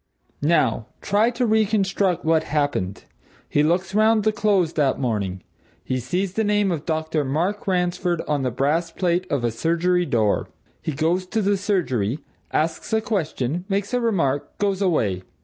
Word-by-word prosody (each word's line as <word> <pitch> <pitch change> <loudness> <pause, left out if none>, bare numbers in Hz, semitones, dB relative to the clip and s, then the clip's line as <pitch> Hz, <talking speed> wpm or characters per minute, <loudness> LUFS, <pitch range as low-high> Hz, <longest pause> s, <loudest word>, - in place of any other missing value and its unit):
Now, 145 -8 +2
try 210 +3 +2
to 245 +1 -1
reconstruct 200 -5 +1
what 160 0 +4
happened. 145 -11 -1 0.4
He 145 - +2
looks 175 +5 +1
round 215 +1 +4
the 215 - +3
Close 200 -6 +1
that 140 -4 +1
morning. 100 -8 -2 0.4
He 130 - -1
sees 180 +10 -2
the 220 - 0
name 205 -2 +2
of 160 -3 -4
Dr. 160 -1 0
Mark 170 +11 -1
Ransford 180 -2 0
on 150 -2 0
the 130 - 0
brass 150 +7 0
plate 180 +1 -1
of 140 -4 0
a 120 - +1
surgery 170 +7 +1
door. 110 -6 +1 0.3
He - - -2
goes 170 +6 0
to 220 +3 0
the 200 +1 +3
surgery, 155 - 0 0.3
asks 160 +2 -1
a 220 - +4
question, 165 - -2
makes 200 +3 -1
a 245 - +2
remark, 165 - 0
goes 200 -1 0
away. 110 - +1
170 Hz, 165 wpm, -23 LUFS, 145-200 Hz, 0.4 s, what